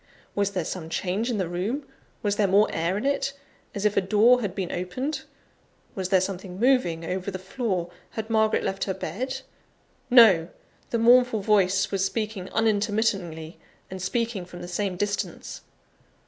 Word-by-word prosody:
Was 200 0 0
there 180 -4 -1
some 165 -2 -5
change 195 +8 -1
in 235 - -1
the 185 -3 -1
room? 205 - -3 0.4
Was 205 -1 +1
there 205 - +3
more 200 +3 +5
air 170 +4 0
in 210 - -3
it, 275 0 0 0.4
as 200 +1 -2
if 210 - +2
a - - +4
door 215 +6 +4
had 200 -4 -3
been 190 -3 -3
opened? 255 - -3 0.7
Was 185 -2 -3
there 190 -1 +5
something 185 0 -4
moving 225 -10 +2
over 185 +3 -3
the 190 - -4
floor? 190 -2 -3 0.2
Had 220 -1 -5
Margaret 220 -1 +2
left 195 0 -2
her 190 - -2
bed? 255 +10 -4 0.7
No! 195 -9 +7 0.4
the 235 - 0
mournful 240 -1 +5
voice 195 -1 +2
was 195 -1 0
speaking 210 -2 -3
unintermittingly, 205 -7 0 0.3
and 190 0 -6
speaking 225 +1 -1
from 175 0 -10
the - - -6
same 185 +1 -2
distance. 205 +1 -3
200 Hz, 165 wpm, -26 LUFS, 185-225 Hz, 0.7 s, No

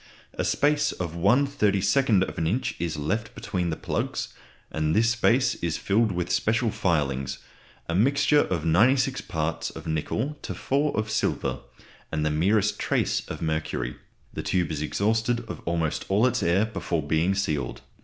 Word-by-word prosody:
A - - -2
space 145 0 +2
of 85 -3 -4
1/32 105 - +2
inch 120 +8 -1
is 85 -2 -2
left 105 +10 -2
between 90 -4 -2
the 80 - -1
plugs, - - -3 0.4
and 80 +1 0
this 115 +1 +4
space 125 +2 +3
is 85 -2 -2
filled 110 +2 +2
with 90 -1 -2
special 110 +1 +1
filings, 70 -8 0 0.5
a 85 - -2
mixture 140 - +3
of 85 - 0
96 125 +10 +3
parts 80 0 -2
of 80 - -10
nickel 110 - -2
to - - -5
4 145 +2 0
of 110 0 -1
silver, - - -1 0.5
and 75 -1 -1
the 75 - +1
merest 100 +7 +2
trace - - 0
of - - -6
mercury. 80 0 -2 0.4
The - - -4
tube 90 -3 0
is 75 -1 -3
exhausted 110 +8 0
of 115 - -8
almost 85 -2 -1
all 100 +5 +3
its 130 - +1
air 90 +5 +3
before 85 -7 -2
being 80 +6 +1
sealed. 75 -10 -2
95 Hz, 155 wpm, -26 LUFS, 80-115 Hz, 0.5 s, this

